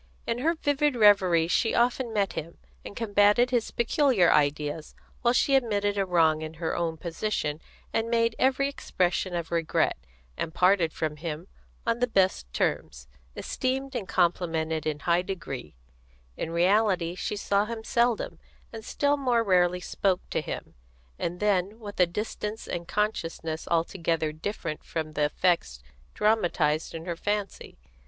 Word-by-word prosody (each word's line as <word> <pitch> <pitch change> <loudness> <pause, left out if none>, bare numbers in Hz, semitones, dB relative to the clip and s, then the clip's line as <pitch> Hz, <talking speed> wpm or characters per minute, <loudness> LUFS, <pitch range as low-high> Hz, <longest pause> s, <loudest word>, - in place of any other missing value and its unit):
In 230 +1 -1
her 325 +6 +1
vivid 290 -2 +1
reveries 185 -6 +5
she 225 - +2
often 240 0 +1
met 200 -3 0
him, 165 +2 -6 0.3
and - - -9
combated 210 +2 +3
his 240 -3 +1
peculiar 235 - +3
ideas, 150 +1 0 0.3
while 240 - +3
she 275 - +3
admitted 205 -6 +2
a 195 -1 0
wrong 160 -3 +3
in 155 0 -6
her 160 0 -2
own 165 -2 -1
position, 165 -3 -3 0.3
and 225 +1 0
made 230 -1 +2
every 270 +1 +3
expression 185 -8 -1
of 170 -1 -4
regret, 165 -2 +1 0.4
and 160 - -4
parted 180 -3 +3
from 155 -1 -3
him 160 +2 -5 0.4
on 230 0 0
the 245 - +2
best 190 - +1
terms, 65 0 -2 0.3
esteemed 265 +1 -2
and 215 -6 -3
complimented 165 -3 0
in 150 -1 -2
high 175 0 +2
degree; 165 - -6 0.6
in - - -4
reality 180 0 +2
she 185 +3 -3
saw 200 0 +1
him 225 0 -6
seldom, 235 0 0 0.3
and 225 -1 -7
still 285 +5 +1
more 245 -4 +2
rarely 180 -3 +3
spoke 185 0 -1
to - - 0
him, - - -6 0.5
and 175 +1 -3
then 205 +1 +1
with 205 -3 -9
a 180 - +5
distance 210 +3 -4
and 170 0 -4
consciousness 165 -6 -2
altogether 165 -2 0
different 160 -1 -5
from 155 -2 -4
the 150 -1 +1
effects 150 - 0 0.4
dramatised 175 -8 +1
in 165 0 -6
her 175 -2 -3
fancy. 205 +3 -3
185 Hz, 150 wpm, -27 LUFS, 165-225 Hz, 0.6 s, reveries